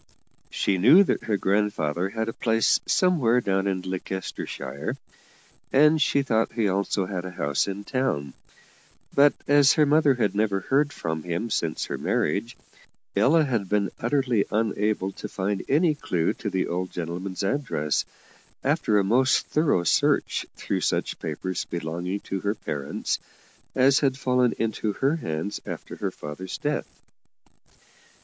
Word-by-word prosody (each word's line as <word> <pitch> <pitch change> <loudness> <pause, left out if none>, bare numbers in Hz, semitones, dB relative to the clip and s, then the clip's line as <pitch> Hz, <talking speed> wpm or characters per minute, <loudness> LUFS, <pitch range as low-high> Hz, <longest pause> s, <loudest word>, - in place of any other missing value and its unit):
She 95 -2 0
knew 145 - +8
that - - -1
her 105 -2 +1
grandfather 95 -4 0
had 110 +2 -3
a 115 - -3
place 115 -1 +2
somewhere 145 -11 +3
down 95 -3 0
in 95 -2 -1
Leicestershire, 95 -5 -5 0.7
and 150 +3 +5
she 140 -2 +2
thought 115 -4 0
he 115 -3 +1
also 100 0 0
had 90 -2 -4
a 95 - -5
house 75 -3 -1
in 100 +1 -4
town; 115 - -2 0.8
but, 145 +1 +5
as 145 -1 +6
her 155 - +4
mother 145 -1 +4
had 110 -5 0
never 100 -2 0
heard 145 +7 +1
from 80 - -4
him 90 +8 -3
since 85 -5 -1
her - - -5
marriage, 115 +9 -1 0.6
Ella 160 +3 +4
had 115 -9 -1
been 105 -2 +1
utterly 125 -3 +1
unable 105 -2 0
to - - -8
find 100 0 -2
any 155 +3 +3
clue 90 - -1
to - - -5
the 95 - 0
old 90 +1 -3
gentleman's 90 +3 -4
address, 95 - 0 0.6
after 105 - +2
a 100 - +3
most 125 +6 +3
thorough 150 - +2
search - - +1
through - - -2
such - - -1
papers 90 +4 -3
belonging 85 +4 -4
to 95 - -4
her 100 +3 -1
parents 75 -8 -3 0.6
as 135 +1 +5
had 135 -2 +1
fallen 125 -2 +2
into 110 -1 -1
her 140 +8 +1
hands 80 - -4
after - - -7
her - - -2
father's 75 +6 -7
death. - - -2
105 Hz, 150 wpm, -25 LUFS, 95-130 Hz, 0.8 s, knew